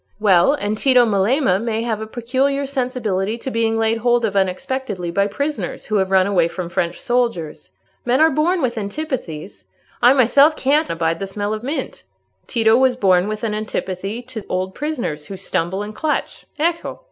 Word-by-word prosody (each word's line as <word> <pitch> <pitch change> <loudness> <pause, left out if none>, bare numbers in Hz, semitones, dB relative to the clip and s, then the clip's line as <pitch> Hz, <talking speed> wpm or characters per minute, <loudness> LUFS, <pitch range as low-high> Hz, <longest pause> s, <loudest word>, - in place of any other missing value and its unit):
"Well, 200 +3 +4
and 210 -4 -3
Tito 255 -3 +5
Melema 205 0 +2
may 225 -1 -1
have 220 -2 -2
a 220 - -5
peculiar 260 +5 -1
sensibility 240 -7 -2
to 260 +3 -6
being 225 -1 +1
laid 225 0 +1
hold 240 0 +2
of 205 -2 -3
unexpectedly 190 0 -2
by 200 +3 +1
prisoners 230 - -3
who 215 - 0
have 190 -1 +1
run 190 -1 +4
away 185 -4 +2
from 170 +1 -5
French 175 0 -2
soldiers. 235 - -1 0.3
Men 250 +2 +2
are 320 +1 +5
born 325 +4 +1
with 240 -3 -1
antipathies; 200 - -5 0.4
I 245 +2 +7
myself 280 +4 +5
can't 295 +4 +1
abide 165 0 -1
the 195 - -3
smell 205 +2 -3
of 215 - -4
mint. 275 +6 -4 0.4
Tito 225 -2 +3
was 260 -1 +3
born 190 -5 +3
with 215 +1 -4
an 220 -2 -1
antipathy 210 +1 -4
to 240 -4 -7
old 185 +1 -2
prisoners 240 - -4
who 195 - -7
stumble 185 +1 -2
and 210 +1 -7
clutch. 305 +6 -3
Ecco!" 335 +2 -1
220 Hz, 180 wpm, -20 LUFS, 190-260 Hz, 0.4 s, I